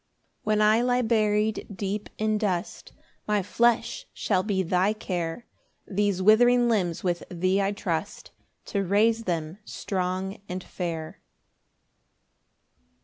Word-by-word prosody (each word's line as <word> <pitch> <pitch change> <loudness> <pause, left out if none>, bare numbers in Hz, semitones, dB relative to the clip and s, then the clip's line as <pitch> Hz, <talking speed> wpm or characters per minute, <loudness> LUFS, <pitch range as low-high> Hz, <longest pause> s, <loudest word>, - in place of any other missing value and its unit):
8 - - -40
When 215 0 +2
I 215 +2 +5
lie 250 0 +2
buried 215 -1 +1
deep 200 +2 -3
in 215 0 0
dust, 185 -5 -3 0.4
My 210 -2 +1
flesh 235 +3 +1
shall 190 -3 +1
be 190 -1 0
thy 185 +4 +2
care 180 -1 -4 0.4
These 200 -1 0
withering 240 +4 +5
limbs 185 -8 0
with 175 -2 0
thee 185 +2 +1
I 195 0 +1
trust 200 -2 -4 0.4
To 200 -1 +1
raise 220 +4 +2
them 165 +1 -3
strong 190 0 -3
and 180 0 -4
fair. 165 -3 -5
200 Hz, 125 wpm, -26 LUFS, 185-215 Hz, 0.4 s, I